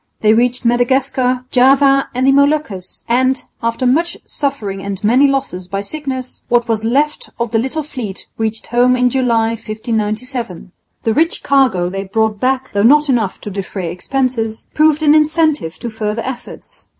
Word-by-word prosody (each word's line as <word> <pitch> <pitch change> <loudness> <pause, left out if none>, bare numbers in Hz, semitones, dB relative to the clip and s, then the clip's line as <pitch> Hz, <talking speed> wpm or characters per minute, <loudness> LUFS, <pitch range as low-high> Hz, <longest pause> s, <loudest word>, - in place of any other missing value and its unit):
They 215 0 +5
reached 245 +2 +1
Madagascar, 250 +1 +1
Java 275 +2 +4
and 255 +1 +1
the 270 - +5
Moluccas, 280 -10 0
and, 255 +2 +1 0.2
after 230 +2 -1
much 330 +7 +1
suffering 225 -10 -3
and 195 -1 -5
many 250 +7 +5
losses 225 -10 -2
by 195 +2 -3
sickness, 260 +2 -6
what 240 0 +2
was 225 -2 -1
left 285 +6 0
of 235 -2 -2
the 225 - +2
little 265 +6 -2
fleet 240 -9 -6
reached 220 0 -3
home 245 +1 +3
in 250 0 +2
July, 235 -4 +2
1597. 220 -2 -4 0.3
The 225 - +1
rich 325 +6 +1
cargo 260 -11 +2
they 195 +2 -4
brought 220 +1 0
back, 260 +2 0
though 200 - +1
not 295 +6 +5
enough 225 -7 0
to 205 - -6
defray 190 -3 -4
expenses, 225 +3 -2
proved 310 0 +3
an 295 -1 +6
incentive 310 - +2
to 235 - -6
further 215 +1 -3
efforts. 250 -1 -9
245 Hz, 160 wpm, -16 LUFS, 215-270 Hz, 0.3 s, an